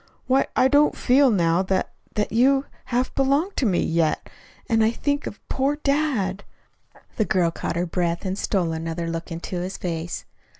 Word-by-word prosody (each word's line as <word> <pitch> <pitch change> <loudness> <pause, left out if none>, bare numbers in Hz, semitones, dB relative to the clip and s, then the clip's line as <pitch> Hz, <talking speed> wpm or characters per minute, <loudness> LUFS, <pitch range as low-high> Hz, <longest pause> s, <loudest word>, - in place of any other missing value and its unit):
"Why, 265 +1 +2
I 255 - +5
don't 290 +2 +3
feel 270 +2 +4
now 170 -4 +2
that 190 0 -1 0.2
that 210 - 0
you 270 +4 +3 0.2
half 250 +1 -1
belong 280 +7 +2
to 255 - +1
me, 185 -4 +2
yet. 165 -1 0 0.4
And 225 -1 +2
and 220 +1 +2
think 285 0 -1
of 205 - -10
poor 275 +2 0
dad!" 275 -10 0 0.7
The 215 - +2
girl 175 -4 +2
caught 170 - -4
her 175 +1 0
breath 170 0 -1
and 190 0 -1
stole 185 -4 0
another 165 +1 -3
look 165 0 -4
into 170 +2 -4
his 185 +2 -4
face. 170 0 -4
200 Hz, 175 wpm, -23 LUFS, 170-265 Hz, 0.7 s, I